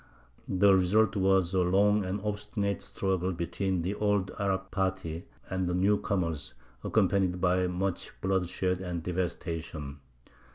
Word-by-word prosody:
The 100 +1 +4
result 95 +3 +3
was 95 -2 +3
a 95 - +3
long 100 +3 +3
and 95 +3 -2
obstinate 105 -1 -2
struggle 95 -1 -1
between 90 +1 -2
the 95 +4 -1
old 105 -2 0
Arab 95 -1 -1
party 95 -3 -2 0.2
and 95 -1 -1
the 90 - 0
new 100 +3 +3
comers, 85 -9 -2 0.3
accompanied 95 -3 +2
by 90 0 +2
much 90 +1 -2
bloodshed 95 -1 0
and 90 -3 -4
devastation. 80 -5 -4
95 Hz, 130 wpm, -29 LUFS, 90-100 Hz, 0.3 s, The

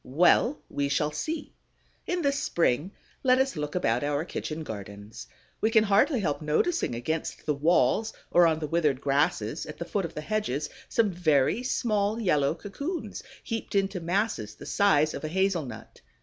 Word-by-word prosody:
Well, 175 - +3
we 140 0 -2
shall 150 +1 +1
see. 305 - -4 0.5
In 355 -1 -1
the 280 - +3
spring, 175 - 0 0.3
let 255 -1 +4
us 265 -3 +1
look 150 0 -4
about 120 -8 +1
our 145 +2 0
kitchen 160 -2 -5
gardens. 100 -3 -8 0.3
We 220 - +3
can 220 -1 +5
hardly 220 +5 +3
help 150 -6 -1
noticing 155 - 0
against 155 +7 -3
the 150 - +1
walls 165 - +2 0.2
or 175 -1 +6
on 160 -1 +2
the 155 - -3
withered 150 -5 +1
grasses 140 -5 0
at 150 - -8
the 170 - -5
foot 195 +1 -1
of 165 - -8
the 150 - -3
hedges 155 -7 -2 0.2
some 225 -5 +2
very 170 - +2
small 215 -4 0
yellow 150 -8 +2
cocoons, 245 - -5 0.2
heaped 225 -3 -4
into 195 -1 +1
masses 170 - -1
the - - -11
size 155 -7 +3
of - - -6
a - - -1
hazel 185 -3 0
nut. - - -11
170 Hz, 175 wpm, -27 LUFS, 145-215 Hz, 0.5 s, or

